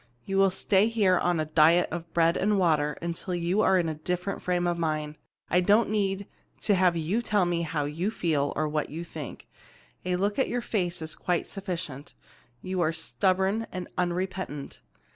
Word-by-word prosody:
You 195 Hz, -, -1 dB
will 195 Hz, 0 st, +6 dB
stay 190 Hz, +2 st, +2 dB
here 205 Hz, -6 st, +3 dB
on 175 Hz, -2 st, +1 dB
a 155 Hz, -, 0 dB
diet 160 Hz, +3 st, +4 dB
of 170 Hz, -1 st, -5 dB
bread 165 Hz, 0 st, +3 dB
and 205 Hz, +1 st, +2 dB
water 155 Hz, -5 st, +2 dB
until 170 Hz, +1 st, -3 dB
you 175 Hz, +4 st, +1 dB
are 190 Hz, -, +4 dB
in 175 Hz, -2 st, +1 dB
a 160 Hz, -, -1 dB
different 180 Hz, +5 st, -3 dB
frame 180 Hz, -1 st, 0 dB
of 175 Hz, -1 st, 0 dB
mind. 155 Hz, -2 st, -1 dB, 0.3 s
I 180 Hz, -, +3 dB
don't 210 Hz, +4 st, +3 dB
need 200 Hz, -2 st, 0 dB, 0.4 s
to 210 Hz, -, +2 dB
have 180 Hz, -2 st, +3 dB
you 175 Hz, +9 st, 0 dB
tell 210 Hz, -5 st, +2 dB
me 175 Hz, -1 st, 0 dB
how 155 Hz, -3 st, -1 dB
you 165 Hz, +7 st, -2 dB
feel, 155 Hz, -9 st, 0 dB
or 155 Hz, -, 0 dB
what 150 Hz, 0 st, -2 dB
you 165 Hz, +3 st, -5 dB
think. 155 Hz, -4 st, -8 dB, 0.6 s
A 180 Hz, 0 st, 0 dB
look 200 Hz, +6 st, 0 dB
at 265 Hz, -, +3 dB
your 245 Hz, -, -1 dB
face 175 Hz, -8 st, -2 dB
is 155 Hz, -1 st, -4 dB
quite 175 Hz, -1 st, -1 dB
sufficient. 175 Hz, -8 st, -6 dB, 0.5 s
You 185 Hz, -1 st, -2 dB
are 160 Hz, -1 st, +2 dB
stubborn 190 Hz, +6 st, 0 dB
and 180 Hz, -1 st, -5 dB
unrepentant. 180 Hz, -4 st, -3 dB
175 Hz, 190 wpm, -27 LUFS, 160-190 Hz, 0.6 s, will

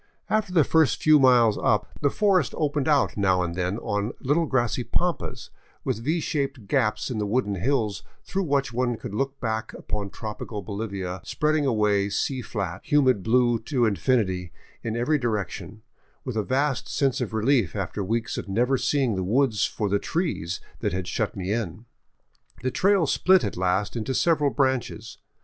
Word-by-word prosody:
After 215 Hz, -3 st, +1 dB
the 170 Hz, -4 st, +5 dB
first 160 Hz, -4 st, +2 dB
few 155 Hz, -1 st, +6 dB
miles 120 Hz, -5 st, +5 dB
up, 105 Hz, -1 st, +2 dB
the 145 Hz, -, +3 dB
forest 195 Hz, +2 st, +2 dB
opened 145 Hz, -2 st, 0 dB
out 145 Hz, -3 st, +3 dB
now 95 Hz, -2 st, +2 dB
and 85 Hz, -1 st, -3 dB
then 90 Hz, +3 st, -1 dB
on 105 Hz, +2 st, -2 dB
little 150 Hz, +5 st, +1 dB
grassy 120 Hz, -2 st, 0 dB
pampas, 175 Hz, +7 st, -2 dB, 0.3 s
with -, -, -1 dB
V 160 Hz, +6 st, +1 dB
shaped 140 Hz, -7 st, -2 dB
gaps 105 Hz, -1 st, 0 dB
in 115 Hz, -, -2 dB
the 105 Hz, -, -1 dB
wooded 105 Hz, -2 st, 0 dB
hills 110 Hz, -1 st, 0 dB, 0.2 s
through 195 Hz, 0 st, -2 dB
which 140 Hz, -3 st, 0 dB
one 120 Hz, 0 st, 0 dB
could 115 Hz, -3 st, -7 dB
look 135 Hz, +5 st, -2 dB
back 110 Hz, -1 st, -3 dB
upon 105 Hz, -2 st, -4 dB
tropi 105 Hz, +1 st, -7 dB
cal 105 Hz, -3 st, -5 dB
Bolivia 100 Hz, -3 st, -4 dB
spreading 150 Hz, -1 st, 0 dB
away 105 Hz, -4 st, +2 dB
sea 130 Hz, +5 st, -1 dB
flat, 95 Hz, -6 st, -4 dB
humid 130 Hz, -8 st, +3 dB
blue 120 Hz, +2 st, +3 dB
to 120 Hz, +1 st, 0 dB
infinity 95 Hz, -4 st, 0 dB, 0.3 s
in 115 Hz, 0 st, -3 dB
every 145 Hz, +6 st, +1 dB
direction, 110 Hz, -2 st, -3 dB, 0.4 s
with 125 Hz, -4 st, -4 dB
a 110 Hz, -, +1 dB
vast 135 Hz, +5 st, 0 dB
sense 135 Hz, -1 st, 0 dB
of 120 Hz, -, -2 dB
relief 110 Hz, -, +1 dB
after 100 Hz, -, -3 dB
weeks 115 Hz, +4 st, -2 dB
of -, -, -7 dB
never 125 Hz, +6 st, +1 dB
seeing 135 Hz, -7 st, +1 dB
the 95 Hz, -, -1 dB
woods 115 Hz, +2 st, +2 dB
for 105 Hz, -, -2 dB
the 100 Hz, +1 st, +1 dB
trees 150 Hz, -, -2 dB, 0.2 s
that -, -, -1 dB
had 90 Hz, -1 st, -3 dB
shut 105 Hz, +2 st, -2 dB
me 95 Hz, +1 st, -2 dB
in. 110 Hz, -1 st, -4 dB, 0.8 s
The 130 Hz, -, 0 dB
trail 195 Hz, +1 st, +3 dB
split 185 Hz, +5 st, +4 dB
at -, -, -2 dB
last 95 Hz, +4 st, 0 dB
into 120 Hz, +3 st, -2 dB
several 155 Hz, -4 st, +3 dB
branches. 130 Hz, -5 st, -1 dB
120 Hz, 175 wpm, -25 LUFS, 105-140 Hz, 0.8 s, few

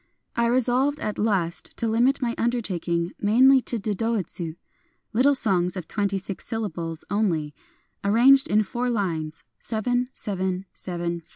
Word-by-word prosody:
I 235 Hz, 0 st, +2 dB
resolved 255 Hz, +4 st, +2 dB
at 210 Hz, -, -3 dB
last 190 Hz, -6 st, -1 dB
to 230 Hz, -, 0 dB
limit 245 Hz, +5 st, +2 dB
my 235 Hz, -1 st, 0 dB
undertaking 180 Hz, -8 st, -1 dB
mainly 255 Hz, +6 st, +5 dB
to 240 Hz, -, -1 dB
dodoitsu, 205 Hz, -6 st, -2 dB, 0.3 s
— -, -, -44 dB
little 270 Hz, +5 st, +4 dB
songs 185 Hz, -7 st, +1 dB
of 180 Hz, -, -6 dB
twenty 200 Hz, -2 st, 0 dB
six 190 Hz, -1 st, -5 dB
syllables 170 Hz, -7 st, -4 dB
only, 165 Hz, -8 st, 0 dB, 0.5 s
ar 200 Hz, -, +1 dB
ranged 270 Hz, +5 st, +6 dB
in 215 Hz, +1 st, +3 dB
four 240 Hz, +4 st, -2 dB
lines 165 Hz, -8 st, -2 dB, 0.2 s
(7, 245 Hz, +3 st, -1 dB
7, 190 Hz, -4 st, -3 dB
7, 175 Hz, -1 st, -4 dB
5). -, -, -31 dB
210 Hz, 150 wpm, -25 LUFS, 180-240 Hz, 0.5 s, ranged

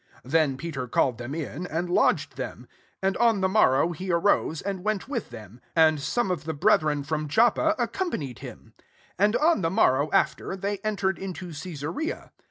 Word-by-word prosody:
23 130 Hz, -, -13 dB
Then 155 Hz, -4 st, +2 dB
Peter 140 Hz, -5 st, -5 dB
called 125 Hz, 0 st, +1 dB
them 120 Hz, +4 st, -5 dB
in, 165 Hz, +2 st, -5 dB
and 170 Hz, +2 st, -2 dB
lodged 175 Hz, -, +2 dB
them. -, -, -6 dB, 0.4 s
And 195 Hz, 0 st, +1 dB
on 230 Hz, -4 st, +3 dB
the 190 Hz, -, +3 dB
morrow 165 Hz, -3 st, +3 dB
he 180 Hz, +3 st, -4 dB
arose, 170 Hz, -2 st, +2 dB
and 195 Hz, -2 st, -4 dB
went 215 Hz, -2 st, -1 dB
with 255 Hz, -5 st, -4 dB
them; 115 Hz, 0 st, -12 dB
and 160 Hz, -2 st, +5 dB
some 220 Hz, -, 0 dB
of 165 Hz, -5 st, -3 dB
the 160 Hz, -1 st, -3 dB
breth 145 Hz, -, +4 dB
ren 150 Hz, -2 st, -1 dB
from 155 Hz, +1 st, -2 dB
Joppa 240 Hz, -, +3 dB
accompanied 235 Hz, -, -3 dB
hinu -, -, -11 dB
24 -, -, -52 dB, 0.4 s
And 210 Hz, +3 st, +3 dB
on 320 Hz, -, +3 dB
the 165 Hz, -, +1 dB
morrow 150 Hz, -7 st, +3 dB
aftcTf 195 Hz, 0 st, 0 dB
they 200 Hz, 0 st, -2 dB
entered 195 Hz, -3 st, -1 dB
into 185 Hz, -2 st, -6 dB
Cesarea. 165 Hz, -, -5 dB
175 Hz, 185 wpm, -26 LUFS, 150-200 Hz, 0.4 s, and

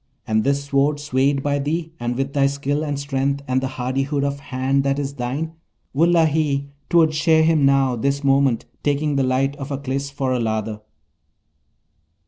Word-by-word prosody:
And 110 Hz, 0 st, +1 dB
this 140 Hz, 0 st, +1 dB
Sword 140 Hz, +1 st, +1 dB
swayed 140 Hz, -1 st, +1 dB
by 145 Hz, 0 st, 0 dB
thee, 160 Hz, +3 st, -2 dB
and 120 Hz, +1 st, -2 dB
with 135 Hz, +1 st, -2 dB
thy 140 Hz, -1 st, +3 dB
skill 140 Hz, +2 st, -1 dB
and 145 Hz, -2 st, -2 dB
strength 140 Hz, 0 st, -1 dB
and 130 Hz, 0 st, +1 dB
the 135 Hz, -, -1 dB
hardihood 135 Hz, +3 st, -2 dB
of 140 Hz, 0 st, -2 dB
hand 135 Hz, 0 st, 0 dB
that 140 Hz, 0 st, 0 dB
is 140 Hz, -1 st, -3 dB
thine, 140 Hz, +5 st, -3 dB, 0.4 s
wullahy! 155 Hz, -3 st, +2 dB, 0.2 s
'twould 165 Hz, -3 st, +4 dB
shear 160 Hz, +1 st, +3 dB
him 160 Hz, -3 st, +4 dB
now, 135 Hz, -2 st, +3 dB
this 140 Hz, +4 st, -1 dB
moment, 135 Hz, -3 st, +2 dB, 0.2 s
taking 145 Hz, 0 st, 0 dB
the 135 Hz, -, +2 dB
light 130 Hz, +2 st, +1 dB
of 135 Hz, 0 st, -6 dB
Aklis 140 Hz, 0 st, -3 dB
for 135 Hz, -2 st, -2 dB
a 125 Hz, -, 0 dB
lather.' 110 Hz, -1 st, -2 dB
140 Hz, 170 wpm, -21 LUFS, 135-145 Hz, 0.4 s, twould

